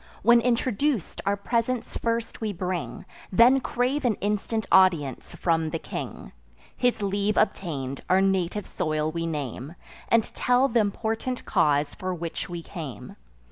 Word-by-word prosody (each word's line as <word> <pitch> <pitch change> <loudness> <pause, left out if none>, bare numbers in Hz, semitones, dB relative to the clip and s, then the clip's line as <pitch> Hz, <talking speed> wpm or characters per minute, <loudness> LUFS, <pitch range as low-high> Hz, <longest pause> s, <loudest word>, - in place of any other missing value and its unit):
When 235 +2 +6
introduc'd, 245 - 0
our 200 0 +2
presents 235 +3 -1
first 230 0 -2
we 215 -2 -1
bring, 180 -1 -4 0.3
Then 240 +7 +6
crave 255 +3 -1
an 235 -4 +2
instant 210 +2 -1
audience 170 -9 +3
from 165 -2 +1
the 165 - -2
king. - - -7 0.4
His 245 -4 +1
leave 200 +1 0
obtain'd, 140 -10 -1
our 185 - +5
native 195 +1 +1
soil 155 -1 -1
we 165 0 -3
name, 145 -1 -5 0.3
And 230 -1 +5
tell 250 +2 +3
th' 235 - +1
important 225 +4 -1
cause 145 -5 +2
for 185 -1 -4
which 165 -1 -5
we 170 -1 -5
came. 150 - -8
195 Hz, 140 wpm, -26 LUFS, 165-230 Hz, 0.4 s, When